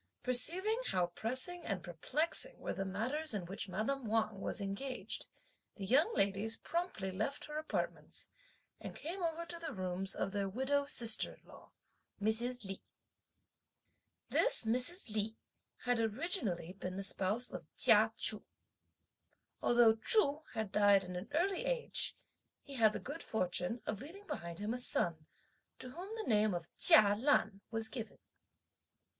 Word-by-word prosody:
Perceiving 360 - 0
how 180 -1 +1
pressing 255 - -4
and 190 -4 -3
perplexing 305 - -1
were - - -4
the 195 - -3
matters 235 +9 +1
in 190 -4 -3
which 195 +2 -5
madame 225 +7 -2
Wang 215 -2 0
was - - -1
engaged, 200 +7 -3 0.5
the 195 - -6
young 285 - +4
ladies 200 +3 +1
promptly 335 - -3
left 220 +9 -3
her 300 0 -5
apartments, 310 - -5 0.5
and - - -8
came 350 +5 -4
over 335 0 -2
to 340 0 -7
the 330 -2 -5
rooms 185 0 -2
of - - -2
their 200 -1 -2
widow 275 +6 0
sister 235 -5 +3
in - - -29
law, - - -15 0.5
Mrs. 225 +3 -1
Li. 195 0 -6 1.5
This - - +5
Mrs. 255 - +1
Li 220 +1 -2 0.5
had 245 -1 +1
originally 220 - -1
been 185 -1 -6
the 195 - -3
spouse 200 +5 0
of - - -8
Chia - - +6
Chu. - - +4 1.2
Although 235 -2 +5
Chu 295 - +5
had 220 -3 -3
died 205 -2 +5
at 180 0 -7
an 180 +3 -6
early 360 +5 0
age, - - -1 0.5
he 280 - -9
had 220 -5 +4
the - - -4
good 290 +5 -7
fortune 185 +2 -1
of 210 -1 -4
leaving 365 +9 -11
behind 170 - -6
him 210 +4 -3
a 250 - -2
son, 165 -9 0 0.5
to 255 - -7
whom 375 - -8
the 445 - -5
name 210 -3 +2
of 170 -1 -7
Chia 205 -1 +8
Lan 220 -4 +1
was 225 -1 -1
given. 225 -2 -7
225 Hz, 150 wpm, -35 LUFS, 195-290 Hz, 1.5 s, Chia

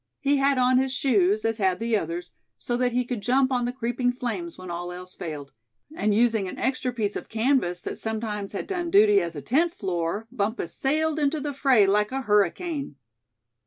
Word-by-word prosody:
He 285 -1 +2
had 275 0 +2
on 255 0 +4
his 265 0 0
shoes, 215 -6 +2
as 225 0 0
had 190 -2 +1
the 230 0 0
others, 175 -2 -3 0.3
so 240 - -3
that 250 0 +1
he 250 +1 0
could 240 -3 -4
jump 260 +4 +2
on 245 -2 +1
the 245 - -1
creeping 245 0 -1
flames 255 +8 -4
when 185 -1 -8
all 175 +1 -4
else 180 +1 -9
failed; 150 -4 -7 0.4
and 215 -9 +1
using 220 -2 +2
an - - -7
extra 260 -1 -1
piece 215 -4 -2
of - - -6
canvas 220 -7 +1
that - - -6
sometimes 215 -2 -4
had 200 - -3
done 350 -3 -3
duty 205 -5 +5
as 170 -1 -4
a 145 - -6
tent 330 - +1
floor, 185 +3 -2
Bumpus 215 -5 -2
sailed 310 +3 0
into 300 +1 +1
the 290 0 -3
fray 265 -6 +4
like 210 +3 +2
a 270 +1 -2
hurricane. 230 - 0
230 Hz, 200 wpm, -25 LUFS, 200-265 Hz, 0.4 s, duty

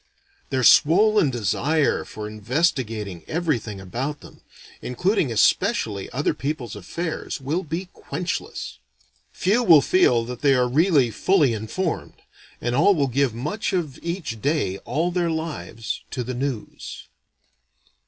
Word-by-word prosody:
Their 130 -2 0
swollen 200 - +5
desire 135 +7 +1
for 105 -1 -7
investigating 110 - -1
everything 145 - -2
about 125 +10 -4
them, - - -15 0.4
including 155 - 0
especially 105 -2 +1
other 140 +4 0
people's 130 -4 -4
affairs, 155 - -4
will 145 +7 -1
be 165 +3 -4
quenchless. 170 - -5 0.5
Few 210 +6 +1
will 160 - +7
feel 125 -11 +3
that 125 0 -7
they 140 -2 +4
really 135 +2 +3
are - - -10
"fully 155 - +3
informed"; 110 - -3 0.4
and 120 - -2
all 180 +10 +4
will 140 -4 +1
give 130 -2 +1
much 195 - -3
of 160 -8 -2
each 170 - -4
day 140 - 0
all 160 +8 0
their 175 -1 0
lives 160 -9 -4
to 125 - -3
the 130 +2 -4
news. 125 -3 -5
140 Hz, 130 wpm, -23 LUFS, 115-165 Hz, 0.5 s, will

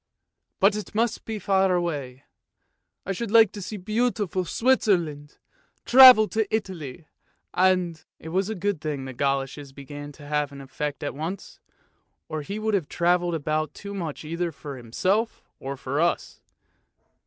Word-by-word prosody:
But 200 +2 +4
it 210 0 -6
must 230 +1 0
be 220 -1 -4
far 195 -2 +2
away! 145 -7 -3 0.8
I 195 - -2
should 220 +3 -3
like 225 -2 +6
to 205 - -8
see 210 +3 -6
beautiful 210 -2 -1
Switzerland, 175 - +1 0.5
travel 250 -4 +9
in 220 -1 +2
Italy, 180 - -4 0.5
and 180 -3 +2
" - - -67
It 160 - -9
was 190 +4 0
a 220 - -3
good 200 -3 -2
thing 145 -4 -3
that 130 - -6
the - - -13
goloshes 135 0 -2
began 145 +1 -9
to 145 - -14
have 150 -1 -1
an 140 - -10
effect 145 +2 -5
at 145 - -3
once, 160 +7 -6 0.7
or 155 -1 -4
he 195 +8 -5
would 215 0 -1
have 185 -7 0
travelled 175 0 +1
about 155 0 -2
too 200 0 -8
much 165 -6 -5
either 170 +2 -2
for 145 -2 -8
himself 185 - -1 0.2
or 135 +1 -5
for 140 +3 -2
us. 170 - -1
175 Hz, 165 wpm, -25 LUFS, 145-205 Hz, 0.8 s, travel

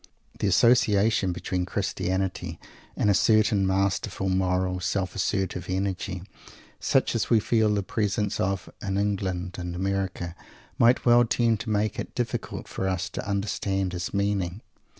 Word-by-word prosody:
The - - +1
association 105 -2 +4
between 90 +1 -2
Christianity 95 -2 -2 0.4
and - - +1
a 100 - +5
certain 105 0 +3
masterful, 95 0 0
moral, 90 0 +1
self 95 0 -1
assertive 95 -3 -1
energy, 95 -1 -2 0.6
such - - +2
as - - -1
we 115 - +5
feel 110 -1 +2
the 100 -1 0
presence 105 0 -1
of 95 0 -1
in 95 -1 -2
England 95 -3 -1
and 90 -1 -4
America, 95 -2 -2 0.4
might 120 +2 +4
well 120 0 +6
tend 115 -1 +1
to 110 - -5
make 105 -1 0
it - - -6
difficult - - -3
for 95 - -3
us 95 +1 -1
to - - -5
understand 100 -1 -1
his 90 0 -3
meaning. 100 -1 -1
95 Hz, 145 wpm, -26 LUFS, 95-105 Hz, 0.6 s, well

